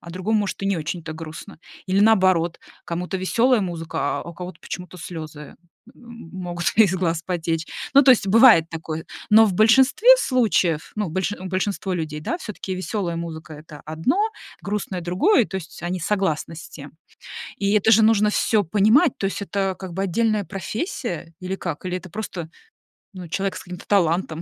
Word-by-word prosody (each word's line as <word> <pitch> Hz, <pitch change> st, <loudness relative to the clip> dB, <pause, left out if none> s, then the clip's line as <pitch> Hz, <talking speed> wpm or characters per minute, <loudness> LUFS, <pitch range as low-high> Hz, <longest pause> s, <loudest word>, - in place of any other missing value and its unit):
а 170 Hz, -, -11 dB
другому, 205 Hz, +5 st, 0 dB
может, 195 Hz, -1 st, -4 dB
и -, -, -1 dB
не 195 Hz, -2 st, +1 dB
очень-то 160 Hz, +1 st, -5 dB
грустно. 160 Hz, +4 st, -9 dB, 0.3 s
Или, 190 Hz, +1 st, +2 dB
наоборот, 185 Hz, -6 st, +3 dB, 0.3 s
кому-то 180 Hz, +3 st, -3 dB
веселая 230 Hz, +5 st, +2 dB
музыка, 165 Hz, -3 st, -3 dB
а -, -, -6 dB
у 170 Hz, -, -9 dB
кого-то 180 Hz, -1 st, -8 dB
почему-то 180 Hz, 0 st, -8 dB
слезы, 155 Hz, -3 st, -8 dB, 0.4 s
м, 235 Hz, -6 st, -13 dB
могут 175 Hz, -2 st, -5 dB
из 205 Hz, -5 st, +5 dB
глаз 170 Hz, -3 st, -1 dB
потечь. 165 Hz, -2 st, -2 dB, 0.3 s
Ну, 280 Hz, -, +8 dB
то 265 Hz, -, +6 dB
есть 230 Hz, -5 st, +4 dB
бывает 220 Hz, -7 st, +7 dB
такое. 160 Hz, -1 st, -6 dB, 0.2 s
Но 220 Hz, +1 st, +7 dB
в 190 Hz, -, -1 dB
большинстве 265 Hz, -, +5 dB
случаев, 210 Hz, -, +1 dB
ну, 210 Hz, -4 st, -1 dB
больш 190 Hz, +5 st, -2 dB
у 190 Hz, -2 st, -7 dB
большинство 190 Hz, 0 st, -2 dB
людей, 155 Hz, -3 st, -4 dB
да, 340 Hz, -, -2 dB
всё-таки 205 Hz, -, -6 dB
веселая 185 Hz, -2 st, -3 dB
музыка- 160 Hz, -2 st, -7 dB
это 150 Hz, -1 st, -12 dB
одно, 160 Hz, -, 0 dB, 0.4 s
грустное- 200 Hz, -2 st, -3 dB
другое, 200 Hz, -, +2 dB
то -, -, -13 dB
есть 170 Hz, -2 st, -7 dB
они 180 Hz, +1 st, -2 dB
согласны 165 Hz, -4 st, -1 dB
с 170 Hz, -, -9 dB
тем. 145 Hz, -1 st, -11 dB, 0.7 s
И 200 Hz, 0 st, 0 dB
это 210 Hz, +1 st, +4 dB
же 220 Hz, -, +5 dB
нужно 210 Hz, -1 st, +4 dB
всё 210 Hz, 0 st, +2 dB
понимать, 220 Hz, -, +3 dB
то -, -, -8 dB
есть 195 Hz, +1 st, -3 dB
это 195 Hz, 0 st, -1 dB
как 185 Hz, -3 st, -7 dB
бы 190 Hz, +2 st, -2 dB
отдельная 215 Hz, +2 st, +1 dB
профессия 195 Hz, -, -5 dB
или 185 Hz, +1 st, -4 dB
как? 170 Hz, -2 st, -6 dB
Или 180 Hz, 0 st, -2 dB
это 185 Hz, 0 st, -7 dB
просто, 180 Hz, -5 st, -6 dB, 0.6 s
ну, 180 Hz, -2 st, -8 dB
человек 195 Hz, +4 st, -2 dB
с -, -, -7 dB
каким-то 180 Hz, -1 st, -10 dB
талантом, 170 Hz, -4 st, +1 dB
185 Hz, 180 wpm, -22 LUFS, 165-210 Hz, 0.7 s, Ну